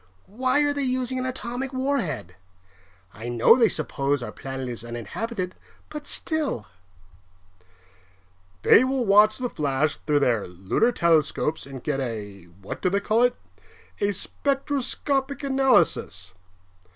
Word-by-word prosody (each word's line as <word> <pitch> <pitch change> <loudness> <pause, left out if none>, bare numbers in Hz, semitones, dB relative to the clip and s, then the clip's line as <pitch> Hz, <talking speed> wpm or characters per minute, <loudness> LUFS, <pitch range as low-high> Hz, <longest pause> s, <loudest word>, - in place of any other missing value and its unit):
Why 255 +7 +1
are 290 0 +2
they 285 - -2
using 255 -1 -1
an 255 - -2
atomic 255 +1 -4
warhead? 245 - -2 0.8
I 110 +3 -8
know 120 - +6
they 235 -4 +4
suppose 140 -3 -1
our - - -5
planet 135 -1 -6
is 120 -2 -5
uninhabited, 180 - -4 0.4
but 300 -1 -7
still 300 - -2 1.0
" 90 0 -33
"They - - +7
will 260 -1 0
watch 210 +1 +5
the 255 - -2
flash 145 - 0
through 145 -1 0
their 120 -6 +1
lunar 95 - 0
telescopes 160 - +1
and 135 -2 -9
get 145 -3 -1
a 105 -7 -5
what 90 +3 -9
do 185 - +2
they 200 +2 +1
call 215 +3 +1
it? 245 0 +3 0.6
a 205 0 +1
spectroscopic 275 +4 -1
analysis. 255 - +2
170 Hz, 135 wpm, -25 LUFS, -, 1.0 s, They